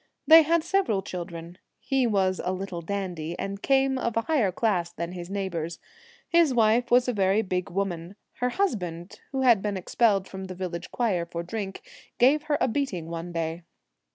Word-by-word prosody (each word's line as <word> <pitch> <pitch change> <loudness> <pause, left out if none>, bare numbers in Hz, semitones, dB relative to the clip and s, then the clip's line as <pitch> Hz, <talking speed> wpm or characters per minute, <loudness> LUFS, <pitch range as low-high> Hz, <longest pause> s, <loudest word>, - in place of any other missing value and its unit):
They 320 +1 +9
had 330 +1 +2
several 320 - +1
children. 175 -2 -7 0.2
He 265 -2 +1
was 190 -4 +1
a 180 - -1
little 185 -2 -4
dandy, 175 -3 -4
and 200 0 -4
came 270 -1 +2
of 235 -2 -2
a - - +3
higher 230 -7 +1
class 180 -4 0
than 170 0 -5
his 175 -1 -7
neighbours. 170 -5 -3 0.5
His 335 -6 +3
wife 230 +1 +3
was 245 +1 +4
a 250 - +1
very 195 +1 +2
big 185 -2 -2
woman. 180 -1 -3 0.2
Her 250 0 0
husband, 180 - -2
who 265 -1 -1
had 235 -6 +5
been 205 -1 -2
expelled 200 0 +2
from 190 0 -7
the 185 -1 -7
village 180 -1 -5
choir 190 -8 0
for 170 0 -5
drink, 195 +1 -5 0.3
gave 275 +5 +5
her 295 - +3
a - - +2
beating 220 - -2
one 170 +1 -5
day. 165 0 -3
195 Hz, 180 wpm, -26 LUFS, 175-240 Hz, 0.5 s, They